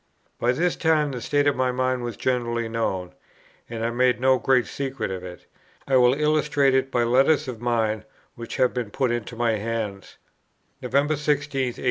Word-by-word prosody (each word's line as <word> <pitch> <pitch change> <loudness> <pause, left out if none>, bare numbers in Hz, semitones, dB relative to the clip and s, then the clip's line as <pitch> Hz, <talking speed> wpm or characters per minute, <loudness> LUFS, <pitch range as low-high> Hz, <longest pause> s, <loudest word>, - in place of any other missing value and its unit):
By 120 - +2
this 170 +7 0
time 155 -3 +2
the 125 -2 -5
state 145 +4 +1
of 145 - +3
my 130 0 +1
mind 130 0 -1
was 120 -3 -5
generally 120 -2 -1
known, 95 -6 -2 0.6
and 115 -1 -4
I 115 - 0
made 125 +1 +2
no 130 0 +3
great 125 +1 +2
secret 135 -6 -4
of 95 -1 -5
it. 90 -2 -10 0.4
I 135 - +2
will 125 +1 +5
illustrate 150 -2 +2
it 130 0 +1
by 120 -2 +1
letters 135 +5 +3
of 120 -3 -6
mine 110 -3 0 0.3
which 115 -1 -8
have 130 -1 +2
been 125 -4 -3
put 130 +3 0
into 120 0 -4
my 115 -2 +1
hands. 105 -2 -5 0.6
"November 140 +4 +1
16, 150 +1 +2
1844. 135 -3 -3
125 Hz, 185 wpm, -24 LUFS, 115-135 Hz, 0.6 s, will